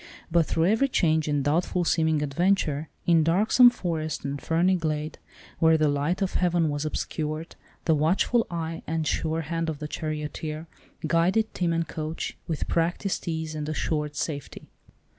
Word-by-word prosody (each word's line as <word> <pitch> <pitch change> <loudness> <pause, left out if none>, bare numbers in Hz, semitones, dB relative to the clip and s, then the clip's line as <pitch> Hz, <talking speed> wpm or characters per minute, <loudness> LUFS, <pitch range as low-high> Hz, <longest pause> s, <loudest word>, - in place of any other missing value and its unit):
But 165 -1 +3
through 165 - +1
every 220 +8 +3
change, 160 - +2
and 145 -2 +1
doubtful 170 +4 +1
seeming 160 -2 +2
adventure, 155 -1 +1 0.2
in 165 -2 +4
darksome 215 +9 +6
forest, 160 -10 -3
and 140 0 -3
ferny 175 +3 +2
glade, 155 -2 -3 0.4
where 160 0 +5
the 155 -1 +3
light 145 +7 0
of 190 - -2
heaven 175 -3 +2
was 145 +1 -2
obscured, 155 +1 -3 0.3
the 160 - +4
watchful 180 +10 +2
eye 165 -1 -4
and 160 0 -1
sure 160 +2 0
hand 165 +1 -2
of 155 - -3
the 150 - -5
charioteer 155 0 -4 0.4
guided 175 +7 +2
team 175 -2 0
and 165 0 0
coach, 155 0 -4
with 160 -3 -2
practised 175 +4 -1
ease 160 -1 -3
and 150 -1 -4
assured 150 -1 -2
safety. 145 -3 -5
160 Hz, 160 wpm, -26 LUFS, 155-170 Hz, 0.4 s, darksome